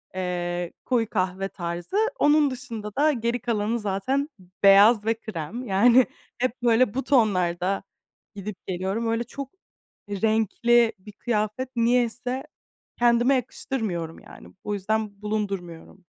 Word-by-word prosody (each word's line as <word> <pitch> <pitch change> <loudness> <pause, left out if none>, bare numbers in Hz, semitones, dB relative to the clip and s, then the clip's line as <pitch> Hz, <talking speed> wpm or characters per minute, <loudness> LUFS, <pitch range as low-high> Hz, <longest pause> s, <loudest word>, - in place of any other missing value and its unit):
eee, 175 -1 -3
koyu 230 -4 +1
kahve 190 0 -1
tarzı. 175 - -4 0.2
Onun 295 -1 +4
dışında 230 -5 -7
da, 300 +2 +4
geri 235 -1 -1
kalanı 225 0 -1
zaten 240 +9 -1 0.3
beyaz 205 +2 +7
ve 225 - +3
krem. 220 +3 -6
Yani, 235 +6 +5 0.3
hep 250 0 -2
böyle 235 -1 +3
bu 270 - -2
tonlarda 190 -7 +1 0.5
gidip, 200 0 -6
geliyorum. 190 +5 -2
Öyle 230 +1 0
çok 275 +2 -8 0.6
renkli 225 +3 +2
bir 210 +3 -12
kıyafet 215 +3 -2
niyeyse 245 +2 +1 0.6
kendime 240 +2 +4
yakıştırmıyorum, 210 -10 -3
yani. - - -14 0.2
O 210 - -3
yüzden 205 0 -2
bulundurmuyorum. 195 -4 -4
220 Hz, 120 wpm, -25 LUFS, 195-240 Hz, 0.6 s, beyaz